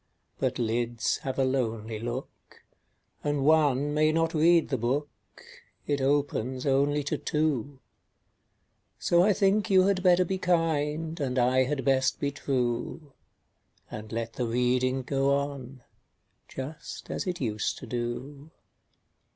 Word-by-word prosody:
But - - 0
lids 120 0 0
have 135 -4 -5
a 135 - +3
lonely 115 -4 -2
look, 120 +3 -7 0.6
And 145 -2 0
one 145 -2 +3
may 155 +1 +3
not 165 +1 +1
read 165 +1 +4
the 135 - 0
book 135 +6 0 0.8
It 145 -2 -1
opens 135 -2 0
only 145 +1 +2
to 145 - -2
two; 145 -3 -1 1.2
So 170 0 +3
I 205 +4 +4
think 205 +2 +2
you 190 -1 +6
had 195 -1 +2
better 180 -1 +4
be 190 +2 -2
kind, 165 -2 0
And 130 -3 -2
I 130 +1 +3
had 135 -1 -2
best 130 0 +2
be 140 - -1
true, 135 +2 -2 0.8
And 110 0 -7
let 115 0 -3
the 125 - -2
reading 125 +2 +1
go 135 +1 +1
on, 140 -3 -5 0.6
Just 135 +4 -7
as - - -3
it 180 -1 -2
used 110 -5 -2
to - - -9
do. 130 +5 -5
140 Hz, 135 wpm, -28 LUFS, 125-155 Hz, 1.2 s, you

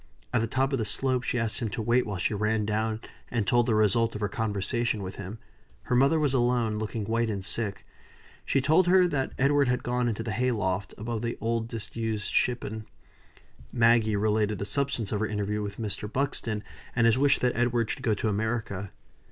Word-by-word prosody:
At 120 - +3
the 115 - 0
top 135 +4 0
of 135 - +1
the - - +1
slope 130 +4 0
she 125 - -1
asked 115 -2 -1
him 115 -3 -2
to 110 - -4
wait 120 +2 +2
while 105 -2 -3
she 90 - 0
ran 105 +1 0
down 110 +1 -1 0.3
and 115 -4 0
told 120 +4 +3
the 110 - +2
result 110 +2 +2
of 105 - -5
her 105 - +1
conversation 110 +1 -1
with 95 +1 -6
him. 100 +3 -6 0.5
Her 125 - 0
mother 140 +5 +4
was 145 -3 +1
alone, 120 -4 +1
looking 110 0 -3
white 115 +1 0
and 100 -3 -3
sick. 105 -1 -2 0.6
She 135 - +1
told 160 +6 +4
her 180 0 +6
that 135 -5 -1
Edward 140 +1 +3
had 125 0 0
gone 125 0 0
into 115 -1 -2
the 110 - -3
hay 125 +4 +1
loft, 95 -5 -1
above 110 +1 -3
the 120 0 -3
old, 115 0 -1
disused 115 -2 -4
shippon. 110 -3 0 0.8
Maggie 115 -2 +4
related 105 0 +1
the 100 - -3
substance 120 -1 -1
of 105 - 0
her 110 - 0
interview 105 0 -2
with 105 -1 -5
Mr. 105 -1 -4
Buxton, 115 -5 -2 0.3
and 120 -1 +3
his 115 +2 +4
wish 140 0 +5
that 125 -1 0
Edward 120 -2 +1
should - - -4
go 115 -5 +1
to 105 - -2
America. 105 -2 -2
115 Hz, 210 wpm, -28 LUFS, 105-125 Hz, 0.8 s, her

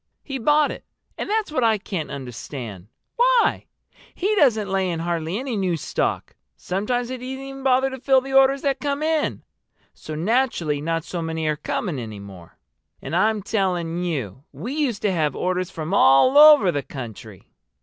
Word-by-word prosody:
"He 270 -2 -5
bought 295 +4 +3
it. - - -9 0.3
And - - -5
that's 430 -4 0
what 255 -5 0
I 225 -1 +3
can't 190 -5 -5
understand. 120 -6 -7 0.3
Why? - - +3 0.5
He 400 +4 0
doesn't 225 - +3
lay 190 -1 0
in 165 -2 -3
hardly 170 +1 -2
any 255 -1 -3
new 185 -4 0
stock. - - -2 0.2
Sometimes 235 +6 -2
he 255 - -4
doesn't 250 +1 -8
even 270 +1 -7
bother 265 0 +2
to 265 - -7
fill 265 +1 +4
the 270 +1 -7
orders 270 0 +4
that 275 -2 0
come 285 +1 -2
in! 315 -1 0 0.5
So 155 - -8
naturally 175 - 0
not 165 +1 -1
so 175 0 -5
many 160 -1 -3
are 155 0 +1
coming 150 0 -3
any 110 -3 -7
more. 95 -4 -13 0.4
And - - -5
I'm 210 +2 +2
telling 180 -5 -1
you 135 - -4
we 245 +5 -6
used 275 -8 -1
to 205 - +2
have 155 -5 0
orders 185 0 -1
from 160 +1 -5
all 170 - +5
over 295 -10 +8
the 145 - -2
country!" 115 -7 -10
195 Hz, 180 wpm, -23 LUFS, -, 0.5 s, over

